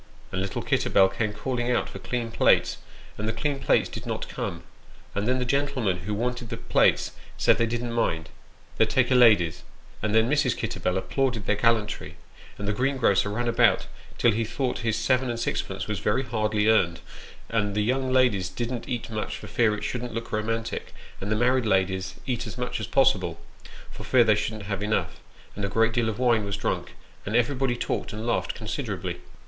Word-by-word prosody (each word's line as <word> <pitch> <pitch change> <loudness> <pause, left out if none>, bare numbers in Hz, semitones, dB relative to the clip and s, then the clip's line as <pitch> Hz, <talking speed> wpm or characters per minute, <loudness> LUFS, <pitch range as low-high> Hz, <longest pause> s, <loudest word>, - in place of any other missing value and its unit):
And 95 - -2
little 95 - -3
Kitterbell 95 -1 +3
kept 105 +2 -2
calling 125 +1 -2
out 120 - +1
for - - -9
clean 120 -2 -3
plates, - - +3 0.4
and 105 - -2
the - - +1
clean 140 +4 -2
plates 135 - +3
did - - -8
not - - -3
come: 85 0 -5 0.5
and 100 +2 -1
then 130 +1 +2
the 125 - -1
gentlemen 130 -7 0
who 100 +5 -4
wanted 125 +1 -2
the - - -4
plates - - +2 0.3
said - - +4
they 115 - +2
didn't 120 +1 -3
mind, 80 -8 0 0.5
they'd - - +3
take 130 -1 +2
a - - +6
lady's; 110 -10 +5 0.4
and 110 0 0
then 110 +1 +5
Mrs. 145 -2 +2
Kitterbell 95 -4 -1
applauded 120 +1 -1
their 105 - +2
gallantry, 115 -1 0 0.4
and 100 - -5
the 105 - +1
greengrocer 125 -5 +2
ran 120 +4 -2
about 120 - +3 0.3
till 120 - +4
he 115 +2 0
thought 125 +3 -2
his 115 -2 0
seven 130 +3 +1
and 120 -1 -2
sixpence - - -2
was - - -2
very 130 - +1
hardly 110 -3 0
earned; 85 -7 +3 0.5
and 105 -3 0
the 105 - +2
young 130 +3 0
ladies 120 -9 +3
didn't 120 +6 -4
eat 120 -2 -3
much 110 -1 -3
for - - -10
fear 110 -3 +2
it 105 - -7
shouldn't 125 -2 -4
look 115 0 -5
romantic, 115 +1 -3 0.3
and 100 +2 -3
the - - +3
married 125 +1 +2
ladies 95 -2 +1
eat 125 -2 -2
as 110 - -7
much 125 -2 -3
as 110 - -4
possible, 95 -10 +2 0.5
for - - -9
fear 125 -2 +5
they 110 -2 +5
shouldn't 105 0 -2
have 100 -1 -3
enough; 105 +1 -1 0.4
and 100 - -4
a 100 - 0
great 115 +2 +2
deal 120 -2 +1
of 105 - -4
wine 120 -4 +3
was 100 -1 -3
drunk, - - -2 0.3
and 105 - -3
everybody 125 +1 +2
talked - - -2
and 110 +1 -5
laughed 120 - 0
con - - -8
siderably. - - -3
115 Hz, 200 wpm, -26 LUFS, 105-125 Hz, 0.5 s, a